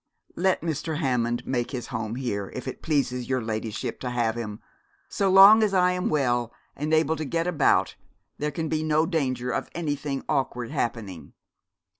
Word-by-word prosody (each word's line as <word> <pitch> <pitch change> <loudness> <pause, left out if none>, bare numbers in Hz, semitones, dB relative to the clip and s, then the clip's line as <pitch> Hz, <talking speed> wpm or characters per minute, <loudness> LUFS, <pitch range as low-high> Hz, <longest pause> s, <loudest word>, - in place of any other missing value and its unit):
Let 190 +1 +1
Mr. 160 -1 -2
Hammond 120 -5 0
make 120 -2 -1
his 125 -3 -5
home 110 0 -3
here, 105 -7 -3
if 130 - -6
it 130 - -6
pleases 125 -5 -1
your 130 -1 +1
ladyship 110 -1 -4
to 125 - -4
have 120 -2 0
him. 110 -3 -5 0.5
So 195 -1 0
long 195 +4 +9
as 205 -3 +2
I 180 0 +4
am 180 0 -1
well 120 -5 +1 0.2
and 150 +2 -3
able 160 0 +3
to 155 - -3
get 165 +3 -1
about 175 -4 +2 0.5
there 150 - 0
can 160 +2 -3
be 155 0 -1
no 155 0 +2
danger 130 -7 -1
of - - -3
anything 145 -4 -3
awkward 125 -5 -1
happening.' 105 -7 -4
135 Hz, 175 wpm, -26 LUFS, 120-160 Hz, 0.5 s, long